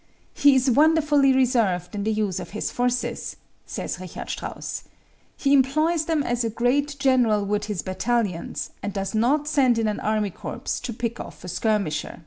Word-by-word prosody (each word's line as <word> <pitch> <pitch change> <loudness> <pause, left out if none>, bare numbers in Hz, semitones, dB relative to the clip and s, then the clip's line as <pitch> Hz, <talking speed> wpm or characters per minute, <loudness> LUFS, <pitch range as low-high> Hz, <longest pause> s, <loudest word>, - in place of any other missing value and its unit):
"He 285 -1 +5
is 260 0 +3
wonderfully 295 0 +4
reserved 230 -9 +1
in 205 -1 -3
the 220 - 0
use 210 -4 -1
of - - -7
his - - -2
forces," 245 0 -1 0.3
says - - -4
Richard 185 -2 -7
Strauss. - - -5 0.5
"He 280 0 +2
employs 310 +4 +3
them 315 -3 +1
as 240 -1 -1
a 230 - 0
great 270 +6 0
general 245 -7 +3
would 210 +1 -1
his 205 -7 -3
battalions, 195 -2 -2
and 205 - -4
does 195 +1 -3
not 270 +7 +2
send 265 -6 +3
in 225 -1 +1
an 210 - -1
army 215 -2 0
corps - - -5
to 245 - -4
pick 235 +1 -4
off - - -9
a - - -7
skirmisher." 190 -7 -1
235 Hz, 175 wpm, -24 LUFS, 210-275 Hz, 0.5 s, He